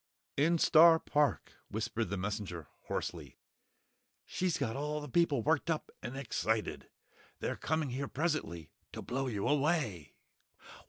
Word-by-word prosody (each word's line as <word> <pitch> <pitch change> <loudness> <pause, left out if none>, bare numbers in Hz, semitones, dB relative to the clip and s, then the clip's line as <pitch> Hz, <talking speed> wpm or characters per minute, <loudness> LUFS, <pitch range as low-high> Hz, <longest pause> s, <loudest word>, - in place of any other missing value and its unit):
"In 165 +4 +3
Star 165 +1 +7
Park," 145 -6 0 0.2
whispered 110 +2 -2
the 100 - -2
Messenger, 95 -4 -4 0.2
hoarsely. - - -4 0.9
"She's 180 -2 -1
got 110 - -2
all 150 +2 -2
the 150 - -7
people 145 -4 +2
worked 160 +1 +1
up 160 -2 -1
and 120 +3 -6
excited! 110 -4 -2 0.5
They're - - -2
coming 155 -3 -1
here 135 +2 -3
presently 130 - -2 0.2
to - - -6
blow 135 +2 -2
you 105 -5 -2
away!" 140 - 0
135 Hz, 130 wpm, -33 LUFS, 110-155 Hz, 0.9 s, Star